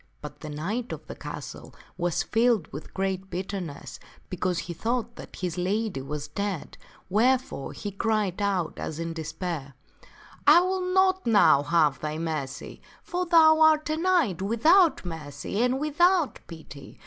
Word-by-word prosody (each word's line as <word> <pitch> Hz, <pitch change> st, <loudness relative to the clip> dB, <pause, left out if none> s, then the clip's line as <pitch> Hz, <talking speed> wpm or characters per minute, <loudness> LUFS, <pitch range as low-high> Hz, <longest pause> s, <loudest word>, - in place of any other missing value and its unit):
But 145 Hz, 0 st, -9 dB
the 155 Hz, -, -8 dB
knight 200 Hz, +12 st, -4 dB
of -, -, -9 dB
the -, -, -7 dB
castle -, -, -9 dB, 0.2 s
was 175 Hz, -1 st, -1 dB
filled 225 Hz, -5 st, +2 dB
with 150 Hz, -, -8 dB
great 190 Hz, 0 st, -3 dB
bitterness, 180 Hz, -4 st, -6 dB, 0.3 s
because 185 Hz, -1 st, -1 dB
he 175 Hz, -, -4 dB
thought 235 Hz, +4 st, -2 dB
that -, -, -11 dB
his 180 Hz, -2 st, -4 dB
lady 200 Hz, -3 st, -1 dB
was 145 Hz, +2 st, -5 dB
dead, 195 Hz, +2 st, -4 dB, 0.3 s
wherefore 240 Hz, -, +1 dB
he 205 Hz, -, -6 dB
cried 205 Hz, -2 st, -1 dB
out 190 Hz, -5 st, -1 dB
as 155 Hz, -, -5 dB
in 165 Hz, 0 st, -4 dB
despair, 160 Hz, -3 st, -5 dB, 0.4 s
" -, -, -25 dB, 0.3 s
I 345 Hz, -, +8 dB
will 365 Hz, 0 st, -1 dB
not 375 Hz, -3 st, +2 dB
now 175 Hz, -10 st, +5 dB
have 150 Hz, -3 st, +2 dB
thy 155 Hz, 0 st, -4 dB
mercy, 155 Hz, -5 st, -5 dB, 0.2 s
for 355 Hz, +2 st, -3 dB
thou 320 Hz, -2 st, +6 dB
art 310 Hz, -1 st, +4 dB
a 310 Hz, -, -1 dB
knight 330 Hz, -, +1 dB
without 305 Hz, -, +4 dB
mercy 160 Hz, +3 st, -4 dB
and 250 Hz, +2 st, +1 dB
without 325 Hz, +2 st, +2 dB
pity. 155 Hz, -4 st, -12 dB
195 Hz, 155 wpm, -26 LUFS, 160-260 Hz, 0.4 s, I